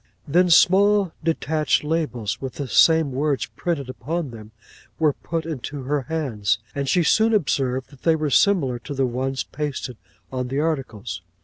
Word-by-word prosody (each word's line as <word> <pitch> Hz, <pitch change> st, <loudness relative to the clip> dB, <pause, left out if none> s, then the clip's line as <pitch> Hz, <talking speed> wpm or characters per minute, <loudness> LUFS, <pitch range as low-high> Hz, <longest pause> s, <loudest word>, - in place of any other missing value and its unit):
'Then 175 Hz, +5 st, +3 dB
small 195 Hz, +2 st, +5 dB
detached 155 Hz, -3 st, +1 dB
labels, 150 Hz, -9 st, -2 dB
with 130 Hz, -2 st, -5 dB
the 140 Hz, -, -5 dB
same 160 Hz, +2 st, +4 dB
words 140 Hz, +1 st, 0 dB
printed 160 Hz, -7 st, -2 dB
upon 150 Hz, +3 st, -4 dB
them, 110 Hz, -2 st, -11 dB, 0.5 s
were 155 Hz, -3 st, +3 dB
put 165 Hz, +2 st, -4 dB
into 145 Hz, -3 st, -5 dB
her 145 Hz, +2 st, 0 dB
hands; 115 Hz, -, 0 dB, 0.2 s
and 140 Hz, -1 st, -2 dB
she 175 Hz, +4 st, +3 dB
soon 220 Hz, +6 st, +3 dB
observed 130 Hz, -8 st, 0 dB
that 140 Hz, -, -17 dB
they 165 Hz, -1 st, +3 dB
were 155 Hz, -2 st, -2 dB
similar 140 Hz, -9 st, +3 dB
to 140 Hz, +4 st, -7 dB
the 135 Hz, 0 st, +1 dB
ones 130 Hz, +2 st, -2 dB
pasted 140 Hz, -5 st, -5 dB, 0.3 s
on 130 Hz, -1 st, -3 dB
the 135 Hz, +3 st, -2 dB
articles. 125 Hz, -, -3 dB
145 Hz, 165 wpm, -23 LUFS, 130-160 Hz, 0.5 s, small